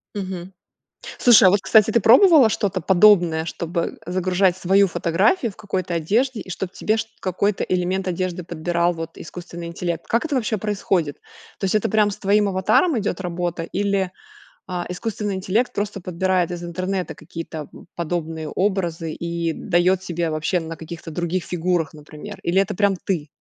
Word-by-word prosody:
Мгм. 185 Hz, -2 st, -5 dB, 0.7 s
Слушай, 240 Hz, -5 st, +7 dB
а -, -, +6 dB
вот, 200 Hz, +1 st, +3 dB
кстати, 220 Hz, -1 st, +5 dB
ты 235 Hz, -, +3 dB
пробовала 270 Hz, -, +7 dB
что-то 195 Hz, -3 st, -1 dB
подобное? 175 Hz, -3 st, +4 dB
Чтобы 170 Hz, +1 st, -3 dB
загружать 185 Hz, 0 st, +1 dB
свою 195 Hz, +2 st, +4 dB
фотографию 220 Hz, -, +1 dB
в -, -, -24 dB
какой-то 185 Hz, -4 st, -3 dB
одежде 220 Hz, -, 0 dB
и -, -, -10 dB
чтоб 185 Hz, +1 st, -4 dB
тебе 215 Hz, +1 st, 0 dB
шт 225 Hz, 0 st, -3 dB
какой-то 195 Hz, +2 st, 0 dB
элемент 185 Hz, +1 st, -1 dB
одежды 180 Hz, 0 st, -2 dB
подбирал, 170 Hz, +1 st, 0 dB
вот, 165 Hz, 0 st, -7 dB
искусственный 170 Hz, 0 st, -8 dB
интеллект? 170 Hz, 0 st, -4 dB
Как 230 Hz, +6 st, +1 dB
это 300 Hz, -, -3 dB
вообще 225 Hz, -3 st, 0 dB
происходит? 190 Hz, -7 st, -1 dB, 0.4 s
То -, -, -4 dB
есть 195 Hz, -, 0 dB
это 215 Hz, -, +2 dB
прям 210 Hz, -1 st, +3 dB
с -, -, -6 dB
твоим 205 Hz, +1 st, +2 dB
аватаром 225 Hz, -, +2 dB
идет 195 Hz, -3 st, -2 dB
работа 175 Hz, -1 st, -3 dB
или, 195 Hz, +1 st, -1 dB, 0.6 s
а, 180 Hz, -1 st, -3 dB
искусственный 205 Hz, +1 st, -3 dB
интеллект 200 Hz, +6 st, 0 dB
просто 205 Hz, -1 st, -3 dB
подбирает 180 Hz, 0 st, 0 dB
из 175 Hz, 0 st, -5 dB
интернета 185 Hz, +2 st, -3 dB
какие-то, 160 Hz, -2 st, -7 dB
м, -, -, -14 dB
подобные 165 Hz, -2 st, -3 dB
образы 175 Hz, -5 st, -1 dB
и 170 Hz, -1 st, -2 dB
дает 180 Hz, +1 st, +1 dB
тебе 170 Hz, -2 st, -2 dB
вообще 155 Hz, +4 st, 0 dB
на 165 Hz, 0 st, -6 dB
каких-то 165 Hz, 0 st, -8 dB
других 175 Hz, +2 st, -2 dB
фигурах, 175 Hz, -2 st, -1 dB
например. 155 Hz, +7 st, -10 dB
Или 180 Hz, +3 st, +2 dB
это 195 Hz, -, -2 dB
прям 200 Hz, 0 st, +2 dB
ты? 165 Hz, -6 st, -1 dB
185 Hz, 165 wpm, -22 LUFS, 170-200 Hz, 0.7 s, Слушай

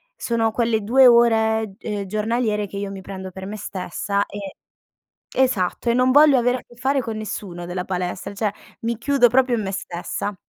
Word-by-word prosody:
sono 230 Hz, -, 0 dB
quelle 230 Hz, -1 st, +1 dB
2 260 Hz, +5 st, +5 dB
ore, 220 Hz, -3 st, +3 dB
ehm, 210 Hz, -3 st, -4 dB
giornaliere 215 Hz, +1 st, 0 dB
che 200 Hz, -, -8 dB
io 200 Hz, 0 st, -3 dB
mi 195 Hz, -1 st, -7 dB
prendo 190 Hz, 0 st, -7 dB
per 190 Hz, +1 st, -8 dB
me 210 Hz, +2 st, -6 dB
stessa 200 Hz, +1 st, -2 dB
e 200 Hz, -2 st, -8 dB, 0.8 s
esatto, 245 Hz, -4 st, +1 dB
e -, -, +4 dB
non 255 Hz, +1 st, +3 dB
voglio 290 Hz, 0 st, +7 dB
avere 245 Hz, +1 st, +2 dB
a -, -, -10 dB
che 240 Hz, -, -20 dB
fare 270 Hz, +3 st, 0 dB
con 225 Hz, -3 st, -5 dB
nessuno 195 Hz, -5 st, -6 dB
della 180 Hz, +1 st, -4 dB
palestra, 185 Hz, +1 st, -4 dB
cioè 210 Hz, 0 st, -1 dB, 0.3 s
mi 230 Hz, 0 st, -2 dB
chiudo 265 Hz, -1 st, +4 dB
proprio 250 Hz, 0 st, +3 dB
in 215 Hz, -, -2 dB
me 195 Hz, -, -3 dB
stessa. 190 Hz, +2 st, -4 dB
215 Hz, 190 wpm, -22 LUFS, 195-240 Hz, 0.8 s, voglio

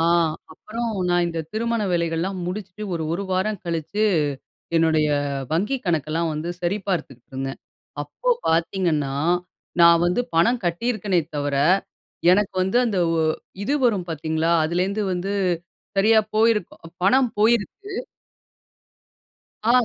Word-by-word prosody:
ஆ -, -, +3 dB, 0.5 s
அப்புறம் 230 Hz, +7 st, -4 dB, 0.2 s
நான் 175 Hz, 0 st, +3 dB
இந்த 165 Hz, -1 st, -3 dB
திருமண 230 Hz, 0 st, 0 dB
வேலைகள்லாம் 170 Hz, +2 st, -1 dB
முடிச்சுட்டு 195 Hz, +2 st, -5 dB
ஒரு, 165 Hz, -, -2 dB
ஒரு 200 Hz, +3 st, -3 dB
வாரம் 190 Hz, +2 st, 0 dB
கழிச்சு, 170 Hz, +6 st, -1 dB, 0.7 s
என்னுடைய 160 Hz, -2 st, +3 dB, 0.4 s
வங்கிக் 210 Hz, +11 st, 0 dB
கணக்கெல்லாம் 160 Hz, 0 st, 0 dB
வந்து 155 Hz, +3 st, -4 dB
சரிபார்த்துட்டு 175 Hz, -, -2 dB
இருந்தேன். 135 Hz, +1 st, -4 dB, 0.4 s
அப்போ -, -, -2 dB, 0.2 s
பாத்தீங்கன்னா, 165 Hz, -4 st, +1 dB, 0.7 s
நான் 170 Hz, 0 st, +7 dB
வந்து 180 Hz, +7 st, +1 dB
பணம் 205 Hz, +10 st, +3 dB
கட்டியிருக்கேனே 190 Hz, +1 st, 0 dB, 0.2 s
தவிர, 145 Hz, -1 st, -1 dB, 0.8 s
எனக்கு 200 Hz, +1 st, +2 dB
வந்து 190 Hz, +5 st, 0 dB
அந்த 205 Hz, -5 st, 0 dB, 0.2 s
ஒ -, -, +2 dB, 0.4 s
இது 280 Hz, +7 st, +1 dB
வரும் 200 Hz, -7 st, +2 dB
பாத்தீங்களா! 160 Hz, +1 st, 0 dB
அதுலேருந்து 185 Hz, +6 st, 0 dB
வந்து 180 Hz, +2 st, -2 dB, 0.6 s
சரியா 220 Hz, +3 st, +5 dB, 0.2 s
போயிருக்கும் 215 Hz, -7 st, +1 dB
பணம் 255 Hz, +4 st, +4 dB
போயிருச்சு. 235 Hz, -, +1 dB, 1.7 s
ஆ, 225 Hz, -, +1 dB
180 Hz, 115 wpm, -23 LUFS, 165-215 Hz, 1.7 s, நான்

